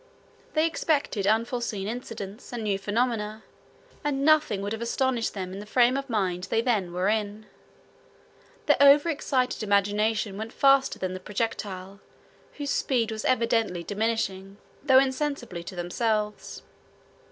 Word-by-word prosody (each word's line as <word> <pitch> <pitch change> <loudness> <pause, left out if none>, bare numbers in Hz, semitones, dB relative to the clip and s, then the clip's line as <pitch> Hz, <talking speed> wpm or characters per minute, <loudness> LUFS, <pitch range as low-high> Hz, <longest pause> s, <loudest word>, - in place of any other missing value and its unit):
They 310 +1 +4
expected 290 - 0
unforseen 225 -2 0
incidents, 225 -2 -7
and 240 -2 -4
new 200 -2 0
phenomena; 215 +1 -1 0.6
and 280 -1 0
nothing 300 -11 +3
would 205 - -3
have 225 - -5
astonished 240 -1 0
them 185 -2 -5
in 195 - -6
the 210 - -9
frame 245 +3 +4
of 275 0 -3
mind 185 -5 -1
they 225 - 0
then 220 -7 0
were 180 +2 -1
in. 210 0 -1 1.2
Their - - +4
overexcited 280 -3 +4
imagination 205 0 +1
went 220 +1 -6
faster 275 -1 +4
than 185 -1 -3
the 185 - -5
projectile, 195 -2 -4 0.5
whose 285 -1 -4
speed 235 -4 0
was 220 -1 -5
evidently 225 -7 +1
diminishing, 200 -2 -2 0.3
though 265 -2 +5
insensibly 265 - 0
to 190 - -8
themselves. 210 +4 -2
220 Hz, 135 wpm, -26 LUFS, 200-255 Hz, 1.2 s, though